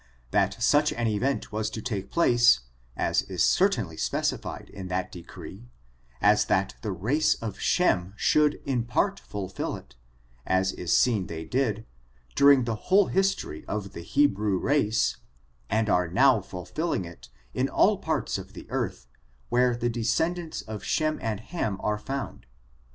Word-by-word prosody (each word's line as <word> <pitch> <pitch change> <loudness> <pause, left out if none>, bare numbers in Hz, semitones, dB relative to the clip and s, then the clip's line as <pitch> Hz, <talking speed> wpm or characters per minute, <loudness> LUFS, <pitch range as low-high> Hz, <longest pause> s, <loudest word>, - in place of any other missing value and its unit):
That - - +1
such 150 +4 +4
an 120 0 -2
event 115 +6 -1
was 110 0 -2
to 110 - -6
take 100 -4 -4
place, 120 - +4 0.4
is - - +1
as 90 -3 -1
certainly 115 - +2
specified - - -2
in 95 -2 -7
that 90 0 -2
decree, 95 +6 -11 0.5
as - - +4
that - - +1
the 105 - -3
race 125 - +1
of 115 -2 -6
Shem 100 - +1
should 150 +3 +3
in 125 -4 0
part 195 +11 0
fulfill 95 -2 -5
it, - - -13 0.5
as 95 +5 +1
is 90 -2 -4
seen 110 -6 +2
they 80 -1 -6
did, 110 0 -1 0.5
during 140 -2 +6
the 115 -1 -1 0.2
whole 195 +1 +5
history 195 - 0
of 100 -2 -4
the 85 - -7
He* 140 +12 +3
brew 105 -6 0
race, 125 -3 +1 0.5
and 110 +1 +1
are 90 -3 +2
now 120 +5 +4
fulfilling 95 - -3
it, 85 -7 -12 0.2
in - - 0
all - - +3
parts - - -1
of - - -11
the - - -10
earth, - - -3 0.4
where 125 0 +3
the 120 0 -1
descendants 160 +9 -1
of 110 -2 -7
Shem 155 -1 0
and 110 -3 -2
Ham 110 - -3
are 105 0 -1
found. 135 +5 -5
110 Hz, 155 wpm, -27 LUFS, 95-140 Hz, 0.5 s, during